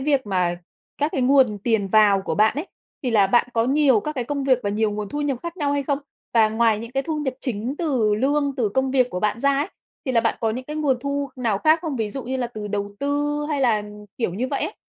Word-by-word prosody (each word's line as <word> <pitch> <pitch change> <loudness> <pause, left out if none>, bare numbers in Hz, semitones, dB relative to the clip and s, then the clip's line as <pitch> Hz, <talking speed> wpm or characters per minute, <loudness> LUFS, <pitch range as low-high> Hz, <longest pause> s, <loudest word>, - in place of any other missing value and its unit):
việc 275 -3 +1
mà 180 -3 0 0.4
các 295 +2 0
cái 270 - -1
nguồn 255 -5 +4
tiền 210 -1 0
vào 205 -1 +4
của - - -2
bạn 215 +1 +3
ấy, 300 +7 -4 0.4
thì 255 - -1
là 210 -4 +4
bạn 240 +5 +3
có 230 -1 +2
nhiều 270 -3 +4
các 300 - -4
cái 250 - -2
công 280 +2 -3
việc 260 -2 +4
và 205 - -1
nhiều 215 +1 +1
nguồn 210 0 -4
thu 290 - -4
nhập 280 -4 -1
khác 340 +1 -6
nhau 290 -4 0
hay 285 0 0
không? 275 0 -1 0.4
Và 225 -2 +5
ngoài 220 -1 +2
những 230 +2 -8
cái 270 - 0
thu 315 +1 -3
nhập 270 -4 -2
chính 240 +1 -3
từ 255 -11 +1
lương, 285 +3 +1
từ 235 -5 +1
công 265 +5 0
việc 255 -2 +2
của 180 - -3
bạn 215 +3 0
ra 280 +1 +3
ấy, 295 +5 -1 0.4
thì 260 - 0
là 235 - +4
bạn 230 - 0
có 225 - +1
những 250 +4 -4
cái 300 +3 -6
nguồn 290 -4 +1
thu 280 +1 -2
nào 230 -6 0
khác 315 +7 +4
không? 310 -6 -3
Ví 220 -3 -1
dụ 265 +6 -5
như 260 +2 -2
là, 250 -2 -1
từ 215 -3 -7
đầu 205 0 -2
tư 290 +1 0
hay 290 -3 -1
là, 225 -5 +2 0.4
kiểu, 205 -8 -1
như 245 +6 -2
vậy - - -2
ấy? - - -3
255 Hz, 275 wpm, -23 LUFS, 215-280 Hz, 0.4 s, Và